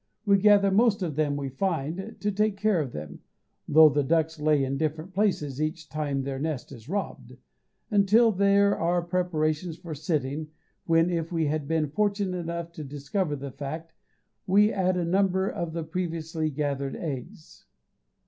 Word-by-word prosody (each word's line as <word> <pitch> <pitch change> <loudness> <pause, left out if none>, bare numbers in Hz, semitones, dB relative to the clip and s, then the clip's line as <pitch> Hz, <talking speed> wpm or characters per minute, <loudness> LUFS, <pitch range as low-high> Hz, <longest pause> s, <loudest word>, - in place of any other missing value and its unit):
We 200 -1 +4
gather 200 -1 +5
most 210 -1 +3
of 160 -5 -3
them 150 -1 +1
we 140 -1 -3
find, 170 - -3
to 210 - 0
take 210 0 0
care 210 -5 +2
of 135 -5 -4
them 75 -5 -8 0.5
(though 155 +1 +8
the 145 0 +1
ducks 160 +2 0
lay 150 -2 +3
in 135 +1 -1
different 155 +3 -3
places 155 -9 0
each 155 0 -3
time 145 -3 -2
their 135 0 -4
nest 150 -4 -3
is 120 0 -12
robbed) 200 +2 -4 0.5
until 215 +3 +5
there 200 0 +3
are 175 +1 0
preparations 170 -2 -1
for 170 -3 -7
sitting, 150 -1 -2 0.4
when, 165 +1 +3
if 165 -1 -2
we 165 -2 0
have 150 -1 -1
been 155 -3 0
fortunate 200 0 0
enough 170 0 -4
to 160 -2 -8
discover 145 +4 -2
the 140 -1 -7
fact, 155 +5 -6 0.5
we 205 +3 +4
add 185 -1 +1
a 175 - 0
number 190 +1 +2
of 170 -4 -3
the 165 0 -3
previously 160 -1 -3
gathered 140 -2 -2
eggs. 150 0 -7
165 Hz, 165 wpm, -27 LUFS, 150-190 Hz, 0.5 s, though